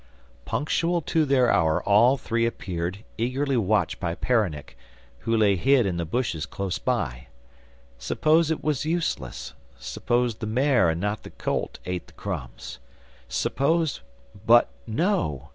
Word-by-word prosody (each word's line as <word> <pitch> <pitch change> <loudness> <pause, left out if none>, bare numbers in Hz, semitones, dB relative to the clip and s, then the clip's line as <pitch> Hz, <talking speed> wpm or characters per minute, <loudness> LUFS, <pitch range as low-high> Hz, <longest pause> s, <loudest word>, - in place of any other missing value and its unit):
Punctual 170 +3 0
to 160 0 +1
their 130 -3 +3
hour 80 -5 +2
all 115 +7 +5
three 115 -1 0
appeared, 90 -2 -4 0.2
eagerly 135 +4 0
watched 110 -2 +1
by 85 -2 -2
Peronnik, 100 - -1 0.4
who 115 - 0
lay 105 -3 +4
hid 130 +5 +3
in 90 -3 -1
the 85 - -2
bushes 85 -4 -2
close 100 -2 -3
by. - - -2 0.7
Suppose 155 - +2
it 160 - -2
was 150 -3 0
useless; 155 - -2 0.2
suppose 120 -2 -1
the 110 - -5
mare, 125 - +3
and 80 +1 -1
not 105 +3 -2
the - - -10
colt, - - -3
ate 90 -1 -4
the - - -19
crumbs? - - -6 0.5
Suppose 160 +2 0 0.5
but 120 +1 +6 0.2
no! 90 - -1
115 Hz, 140 wpm, -25 LUFS, 90-140 Hz, 0.7 s, but